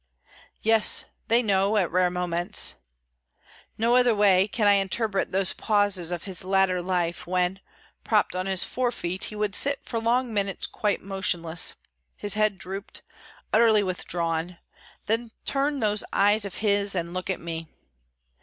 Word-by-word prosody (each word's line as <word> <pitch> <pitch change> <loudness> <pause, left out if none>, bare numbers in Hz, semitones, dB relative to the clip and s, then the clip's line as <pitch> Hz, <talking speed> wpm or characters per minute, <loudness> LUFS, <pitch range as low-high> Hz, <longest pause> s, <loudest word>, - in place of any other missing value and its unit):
Yes, 225 -1 +4 0.2
they 235 +2 +3
know, 200 0 +2
at 185 -4 +1
rare 180 +1 +2
moments. 175 -1 -1 1.0
No 230 +2 +2
other 245 -2 +4
way 195 -2 +4
can 215 +1 -1
I 205 - +6
interpret 200 +1 0
those 190 0 0
pauses 205 -5 +1
of 175 -2 -2
his 190 -1 -1
latter 190 -1 +2
life, 175 -2 -2
when, 180 +1 0 0.4
propped - - +1
on 185 +1 -2
his 190 -2 +2
forefeet, 235 -8 -2
he 215 - -8
would 210 -1 -2
sit 280 +4 +2
for 230 - -3
long 235 +1 0
minutes 200 -2 -1
quite 210 -1 -2
motionless—his 170 - -2
head 215 -2 +1
drooped, 195 +3 -7 0.5
utterly 220 -2 +5
withdrawn; 170 -2 -3 0.5
then 230 +2 -1 0.2
turn 280 +1 -1
those 210 -1 +1
eyes 205 +1 +3
of 195 - -7
his 200 -1 +2
and 170 -1 -3
look 185 +1 -4
at 190 - -1
me. 165 -1 -6
195 Hz, 145 wpm, -25 LUFS, 180-215 Hz, 1.0 s, I